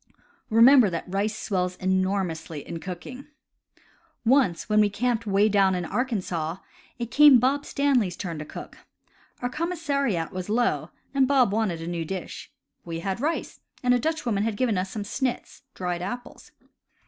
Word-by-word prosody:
Remember 235 +1 +7
that 170 -2 -3
rice 200 +3 -1
swells 180 -2 -1
enormously 185 -5 -1
in 165 - -5
cooking. 190 - -8 1.0
Once 245 -8 +3
when 215 0 +3
we 210 -1 +4
camped 230 +2 -1
'*'way 200 +1 +4
down 195 -3 +3
in 180 -1 -2
Arkansaw," 185 -7 -2 0.4
it 235 -1 -5
came 290 -4 +8
Bob 275 +4 +1
Staley's 250 -11 +1
turn 170 -5 -5
to - - -4
cook. - - -10 0.6
Our 245 - 0
commissariat 280 - -1
was 185 0 -5
low; 240 +3 +1 0.2
and 270 -2 +3
Bob 255 -7 +3
wanted 200 -7 -1
a - - -6
new 170 -1 -2
dish. 185 +2 -6 0.3
We 165 -1 -5
had 195 +4 -3
rice; 315 +4 -2 0.2
and 250 0 +4
a 245 - +3
Dutchwoman 250 -8 -1
had 215 -1 -1
given 245 -5 +1
us 185 +1 -1
some 210 +1 -4
"suits" 250 +4 -3
(dried 180 -1 -3
apples). 245 +7 -7
210 Hz, 160 wpm, -25 LUFS, 180-250 Hz, 1.0 s, came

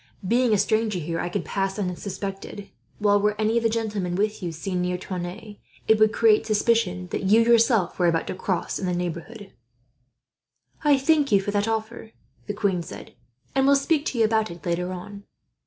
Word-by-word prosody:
Being 240 +2 +3
a 210 - +4
stranger 215 0 +1
here 165 0 -3
I 175 - -2
could - - -3
pass 195 -1 -2
unsuspected; 195 +1 -5 0.3
while 205 -1 +3
were 210 0 0
any 220 +2 +2
of - - +2
the 225 - +2
gentlemen 210 -6 -2
with 210 +2 -1
you 175 -2 -3
seen 180 +3 -3
near 180 0 -1
Tonneins, 185 +4 -7 0.3
it 220 -1 +4
would 215 0 +5
create 225 -2 +4
suspicion 210 -4 +1
that - - -2
you, 215 +4 +5
yourself, 230 -5 +3
were 175 - +3
about 165 -1 +1
to - - -4
cross 185 -1 -2
in 190 - -3
the 180 - 0
neighbourhood." 180 +5 -5 1.3
"I 295 -2 +5
thank 290 0 +2
you 200 - +5
for 195 +1 -3
that 205 +1 0
offer," 225 0 -4 0.3
the 205 - -3
queen 195 -4 0
said, 165 - -10 0.4
"and 270 0 +2
will 280 - +6
speak 290 +2 +1
to 250 - -3
you 225 - +4
about 220 0 +1
it, 170 -1 -11
later 180 +1 -1
on." 200 +3 -8
205 Hz, 195 wpm, -24 LUFS, 180-225 Hz, 1.3 s, will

